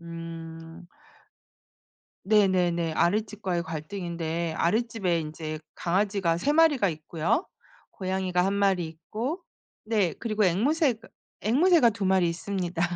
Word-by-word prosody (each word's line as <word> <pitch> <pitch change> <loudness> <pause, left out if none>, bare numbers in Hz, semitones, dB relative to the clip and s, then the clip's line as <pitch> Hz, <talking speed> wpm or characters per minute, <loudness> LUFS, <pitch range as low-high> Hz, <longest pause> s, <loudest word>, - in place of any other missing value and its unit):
음. 165 0 -9 1.4
네네네. 180 -5 +2
아랫집과의 195 0 0
갈등인데 165 0 -4
아랫집에 195 -3 +1
인제 155 0 -5 0.2
강아지가 190 -1 +1
3 280 +12 +1
마리가 300 -9 +4
있고요. 160 - -1 0.5
고양이가 185 -2 -1
1 195 - +1
마리 195 -4 +2
있고 225 - -5 0.4
네 210 -7 +1
그리고 215 -2 0
앵무새가 240 - +1 0.3
앵무새가 285 - +4
2 205 -2 -4
마리 185 -2 +3
있습니다. 175 0 -3
185 Hz, 255 characters per minute, -27 LUFS, 170-215 Hz, 1.4 s, 마리가